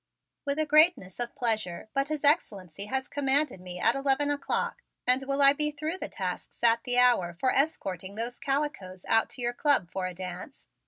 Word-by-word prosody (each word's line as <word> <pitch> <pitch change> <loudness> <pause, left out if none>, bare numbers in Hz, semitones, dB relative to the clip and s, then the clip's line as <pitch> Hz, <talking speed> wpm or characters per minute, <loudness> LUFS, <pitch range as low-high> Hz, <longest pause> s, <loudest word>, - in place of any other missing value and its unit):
"With 280 +1 -1
a 310 - +1
greatness 305 - +4
of 240 -1 -3
pleasure, 215 -7 -1
but 275 +1 0
His 305 -1 -2
Excellency 200 - 0
has 265 +3 -2
commanded 280 -6 +1
me 180 -1 -8
at 230 - +4
eleven 275 +2 +1
o'clock 290 +10 -2 0.2
and 255 +2 +2
will 280 0 +3
I 275 0 +8
be 300 +1 -1
through 310 +5 -5
the - - -5
tasks - - -6
at 230 0 +4
the 245 0 +1
hour 240 -9 +3
for 200 +10 0
escorting 195 - -2
those 235 +2 -5
calicoes 270 -10 -3
out 225 0 +2
to 250 - -6
your 240 0 0
Club 245 - +1
for 185 -1 -3
a 180 - -8
dance?" 185 +8 -8
250 Hz, 195 wpm, -28 LUFS, 190-285 Hz, 0.2 s, I